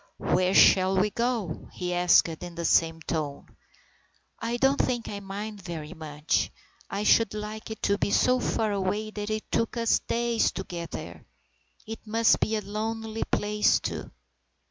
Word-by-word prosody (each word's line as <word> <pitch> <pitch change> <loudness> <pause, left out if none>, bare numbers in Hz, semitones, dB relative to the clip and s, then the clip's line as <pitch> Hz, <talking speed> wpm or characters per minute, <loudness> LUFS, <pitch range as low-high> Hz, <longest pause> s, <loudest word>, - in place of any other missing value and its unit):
"Where 185 +1 +1
shall 190 0 +6
we 205 +2 +2
go?" 230 -9 -2
he 180 0 -3
asked 175 0 +5
in 170 +1 -7
the 170 0 -3
same 165 0 +3
tone. 150 -4 -4 0.4
" - - -39
I 240 - -1
don't 270 +2 +3
think 240 -2 0
I 205 - -5
mind 200 +1 -6
very 170 -3 -6
much. 155 -2 -1 0.4
I 200 - -2
should 215 -1 +4
like 215 +1 -6
it 220 - -8
to 200 0 +2
be - - 0
so 255 +4 +3
far 220 -3 0
away 205 +2 -1
that 210 0 -5
it 215 0 -4
took 230 +1 0
us 230 -1 +3
days 235 -1 +1
to 190 - -4
get 170 -2 -6
there. - - -8 0.6
It 225 0 -6
must 225 +1 +3
be 220 - 0
a 215 - -1
lonely 220 +2 -4
place, 210 0 +2
too." - - -5
205 Hz, 170 wpm, -27 LUFS, 180-225 Hz, 0.6 s, shall